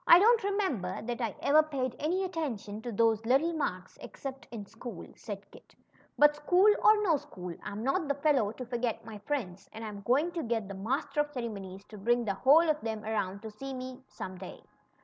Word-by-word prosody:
don't 430 +7 +8
remember 375 - -1
that 240 +2 -3
I 225 -4 -1
ever 305 +2 +6
paid 270 -5 -3
any 355 +6 0
attention 260 - -4
to 240 - -5
those 225 0 +2
little 275 +8 +3
marks, 185 - -3
except 270 -3 -7
in 220 -4 -7
school," 225 -2 -8
said 205 -1 -7
Kit; - - -17 0.4
but 295 0 +6
school 360 +8 +5
or 425 0 +6
no 335 -7 +4
school. 180 -9 -8
I'm 210 +1 -5
not 285 +6 +1
the 280 - +1
fellow 280 -7 +2
to 255 - -7
forget 240 -2 -2
my 220 -2 -8
friends, 200 -6 -4
and 225 +1 -7
I'm 205 -2 -6
going 275 - +2
to 340 -1 -3
get 225 -5 -1
the 200 - -6
Master 245 +10 -2
of 295 0 +2
Ceremonies 200 -7 -6
to 215 - -11
bring 240 +3 +2
the 200 - 0
whole 295 - +5
of 305 -1 +1
them 220 -1 -3
around 205 -2 -2
to 220 - -6
see 270 +5 -6
me 255 +1 -7
some 185 -1 -7
day." 185 - -9
240 Hz, 205 wpm, -30 LUFS, 210-295 Hz, 0.4 s, don't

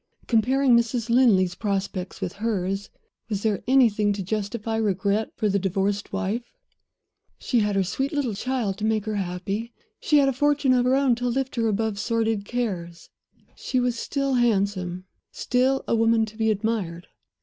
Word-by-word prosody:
Comparing 255 +3 +3
Mrs. 235 0 0
Linley's 205 -8 +4
prospects 195 -2 -3
with 175 - -3
hers, 195 -3 -1 0.4
was 205 -2 -2
there 215 -3 0
anything 225 -6 +4
to 200 -1 -4
justify 215 +3 -3
regret 205 0 0
for 215 - 0
the 200 0 +1
divorced 195 +2 -1
wife? 200 +4 -2 1.0
She 245 - 0
had 210 -2 0
her 195 - +3
sweet 265 +10 -2
little 280 -7 -1
child 225 -2 -2
to - - -5
make 215 -1 +1
her 215 -1 -2
happy; 195 +5 -4 0.2
she 300 - +3
had 280 -1 +5
a 270 - +1
fortune 290 0 +2
of 250 -1 +2
her 255 +1 +3
own 270 -2 +3
to 245 0 -2
lift 265 +1 -2
her 230 -1 +2
above 215 -1 -1
sordid 225 -2 0
cares; 185 -8 -4 0.4
she 255 - -1
was 245 -1 0
still 275 +3 -2
handsome, 195 -6 0 0.3
still 260 +2 +1
a - - +2
woman 225 0 +3
to 215 0 -12
be 220 0 +1
admired. 205 -5 -2
220 Hz, 170 wpm, -24 LUFS, 200-245 Hz, 1.0 s, had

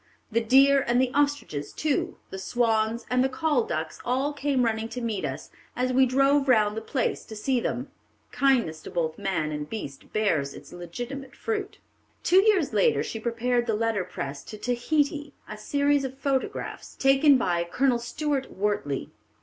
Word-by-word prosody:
The 230 +2 +2
deer 270 +4 +5
and 240 +1 +3
the 255 -1 +2
ostriches 285 - 0
too, 300 -3 -1
the 190 - -5
swans 225 +1 0
and 250 0 +3
the 265 - +1
call 285 -2 +1
ducks, 155 -1 -4
all 265 +4 0
came 280 -3 0
running 225 0 -1
to 250 - -5
meet 225 -4 -2
us, - - -5 0.2
as 255 +1 0
we 260 +1 +5
drove 275 +2 +3
round 215 -4 +4
the 220 - -3
place 260 +1 -1
to 220 - -9
see 250 +4 0
them." 255 +3 -3 0.4
Kindness 235 - +2
to - - -9
both 160 -2 -2
man 160 -6 -1
and 150 0 -4
beast 140 -11 -7
bears 160 -10 0
its - - -12
legitimate 245 +11 -7
fruit. 420 -2 -3 0.5
Two 370 +2 +6
years 395 -7 +2
later 475 -2 +3
she 225 - -5
prepared 240 +1 0
the 225 - +1
letter 225 -3 0
press 140 -6 -6
to 215 - -8
Tahiti: 285 +5 -1
a 215 - -6
Series 285 +6 +1
of 265 0 -5
Photographs, 275 -1 -3
taken 270 +1 +5
by 175 -7 0
Colonel 245 +8 +1
Stuart 275 +3 -2
Wortley. 190 -9 -2
245 Hz, 175 wpm, -26 LUFS, 210-275 Hz, 0.5 s, Two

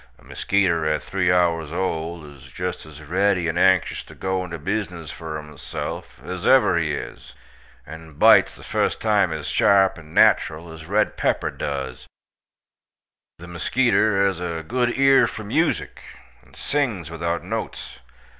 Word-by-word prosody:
A - - -23
muskeeter 90 -5 0
at 75 0 0
3 90 -2 0
hours 85 -4 +1
old 85 -2 -3
iz 70 -2 -14
just 90 +1 -5
az 75 0 -12
reddy 90 +2 +1
and 80 - -1
anxious 95 -2 +3
to - - -14
go 95 0 -2
into 85 -2 -6
bizzness 90 -2 -4
for 80 -2 -6
himself, 75 -4 -7
az 90 +2 -4
ever 130 -8 +5
he 75 -2 -1
iz, - - -9 0.5
and 80 -1 -11
bites - - +6
the - - -14
fust - - -1
time 105 -5 +2
az 80 -2 -5
sharp, 95 -3 +3
and 80 -2 -15
natral, 80 +1 +3
as 80 0 -11
red 105 +3 +1
pepper - - 0
duz. 70 -2 -5 1.3
The 85 - -11
muskeeter 105 +2 +1
haz 95 -3 0
a 85 -2 -4
good 120 0 0
ear 135 0 +5
for 110 - -7
musik, 155 +11 -1 0.4
and - - -22
sings 115 - -2
without 85 +1 -3
notes. - - -6
85 Hz, 155 wpm, -22 LUFS, 80-100 Hz, 1.3 s, bites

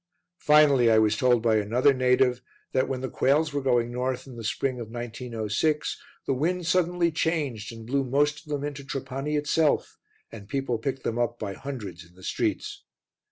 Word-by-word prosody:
Finally, 145 -5 +5
I 110 - +5
was 110 -1 +4
told 120 0 +3
by 110 -2 +3
another 120 +7 +3
native 125 -1 +2 0.3
that 130 0 +1
when 130 -1 -2
the 130 - -2
quails 145 +4 +1
were 145 - -1
going 120 -3 +1
north 125 +1 -2
in 130 -3 -11
the 115 - -8
spring 130 +4 -1
of 115 -2 -6
1906 120 +4 -2 0.2
the - - +1
wind 170 +6 -1
suddenly 175 0 +2
changed 145 -10 -1
and 115 -1 -10
blew 135 +3 0
most 145 +3 +1
of 155 - -18
them 145 -1 -2
into 145 -1 -5
Trapani 135 +2 -4
itself, 150 +1 +1 0.3
and 100 -3 -11
people 135 -4 -1
picked 135 +3 -3
them 115 +1 -2
up 120 0 0
by 100 -3 -4
hundreds 105 -9 -7
in 85 +1 -21
the 95 - -16
streets. - - -2
130 Hz, 185 wpm, -26 LUFS, 115-145 Hz, 0.3 s, Finally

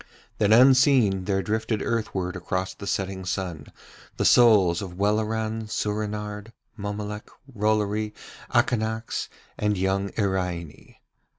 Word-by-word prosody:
Then 105 -1 +3
unseen 125 -5 +5
there 95 -1 0
drifted 110 0 -1
earthward 95 -6 -2
across 90 +1 -3
the 100 - -9
setting 95 -1 -2
sun 90 -5 -4 0.5
the - - 0
souls 105 -8 +5
of 90 -3 -7
Welleran, 110 +2 -1
Soorenard, 105 0 -3 0.2
Mommolek, 105 0 -5 0.2
Rollory, 105 0 0 0.4
Akanax, 110 -1 0 0.3
and 105 -1 +1
young 95 +1 0
Iraine. 90 -6 -3
105 Hz, 105 wpm, -25 LUFS, 95-110 Hz, 0.5 s, unseen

